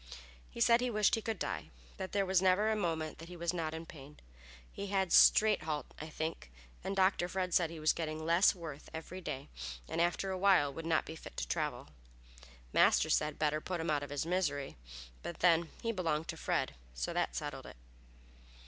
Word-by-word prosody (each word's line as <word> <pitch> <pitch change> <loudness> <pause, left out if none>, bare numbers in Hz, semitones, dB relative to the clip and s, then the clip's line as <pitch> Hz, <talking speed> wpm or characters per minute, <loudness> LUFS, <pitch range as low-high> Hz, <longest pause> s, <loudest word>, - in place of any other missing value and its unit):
He - - -10
said 235 +1 +5
he 250 - 0
wished 215 -3 +2
he 225 - +2
could 220 -1 -3
die, 95 - -4 0.3
that 185 - -5
there 200 -1 +1
was 190 -1 +3
never 190 +4 +3
a - - +1
moment 165 -6 -2
that 165 - -9
he 180 - -9
was 170 +1 -1
not 165 -3 -2
in 160 +1 -6
pain. 145 -2 -12 0.6
He 200 - -5
had 190 -2 +1
stringhalt, 160 -9 +5
I 155 - -6
think, 160 - -4 0.3
and 195 - -2
Dr. 190 -2 +3
Fred 185 -2 -2
said 170 -2 +3
he 165 -1 -8
was 155 0 +3
getting 155 -1 -4
less 170 +5 +5
worth 155 -5 -8
every 175 +3 -7
day 135 -6 -5 0.4
and - - -1
after 175 +3 0
awhile 185 -7 +3
would 165 +3 -6
not 160 -2 +2
be 160 - -7
fit - - -11
to - - -2
travel. 65 - -2 0.8
Master - - +4
said, 150 -1 +1
better 155 0 +1
put 180 +1 -3
him 165 -1 -1
out 145 -1 +1
of 145 - -6
his 145 +1 -2
misery, 160 -6 -1 0.5
then, 170 0 +3
but 170 - -10
he 230 - +1
belonged 165 -6 -1
to - - -2
Fred, - - -1 0.2
so 60 - -3
that - - -1
settled - - -5
it. - - -12
165 Hz, 200 wpm, -33 LUFS, 155-190 Hz, 0.8 s, said